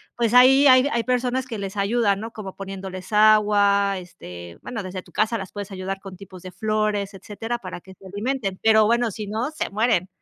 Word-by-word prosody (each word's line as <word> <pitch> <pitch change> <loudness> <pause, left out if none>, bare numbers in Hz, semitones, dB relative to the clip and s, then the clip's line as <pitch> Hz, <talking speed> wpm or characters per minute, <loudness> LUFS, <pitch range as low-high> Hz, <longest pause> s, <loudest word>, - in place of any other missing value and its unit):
pues, 235 -1 0
ahí 260 +3 +7
hay 255 +1 +6
hay 235 0 0
personas 250 +1 0
que 235 -4 -6
les 195 0 -6
ayudan, 200 0 +1
¿no? 225 +1 -6
Como 200 -4 -8
poniéndoles 190 -1 -8
agua, 205 -2 +4
este, 90 - -10
bueno, 235 -4 -5
desde 185 -1 -6
tu - - -21
casa 225 +2 0
las 195 -3 -7
puedes 205 -1 -7
ayudar 190 0 -5
con 195 -1 -10
tipos 185 -1 -12
de 185 - -8
flores, 215 -2 -1
etcétera, 220 +4 -5
para 185 -5 -8
que 190 0 -15
se 195 - -19
alimenten, 205 0 -3
pero 220 -1 +5
bueno, 235 0 +1
si 210 +1 -7
no, 225 +7 -2
se 315 - -4
mueren. 210 -3 +1
205 Hz, 205 wpm, -23 LUFS, 195-230 Hz, -, ahí